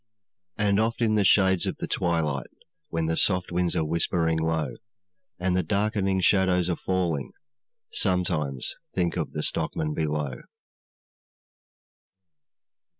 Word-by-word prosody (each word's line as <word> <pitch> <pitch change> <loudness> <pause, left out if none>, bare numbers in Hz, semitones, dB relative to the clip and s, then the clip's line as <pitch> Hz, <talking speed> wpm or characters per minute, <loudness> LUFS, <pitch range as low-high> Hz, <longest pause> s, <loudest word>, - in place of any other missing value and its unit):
'And 105 -1 +2
oft 115 +1 0
in 115 -3 +2
the 105 -1 +3
shades 95 -1 +4
of - - -3
the - - -3
twilight, 80 -5 -1 0.4
When 80 -1 -1
the 80 0 0
soft 90 0 +2
winds 90 0 +1
are 80 - +1
whispering 80 0 +1
low, 80 -5 -1 0.6
And 90 0 0
the 90 - +3
darkening 100 +1 0
shadows 90 -2 +3
are - - 0
falling, 85 -7 -1 0.6
Sometimes 85 - 0 0.2
think 90 -2 0
of 85 -3 -3
the 75 - -2
stockman 75 -1 0
below.' 75 -5 -2
90 Hz, 125 wpm, -26 LUFS, 80-95 Hz, 0.6 s, shades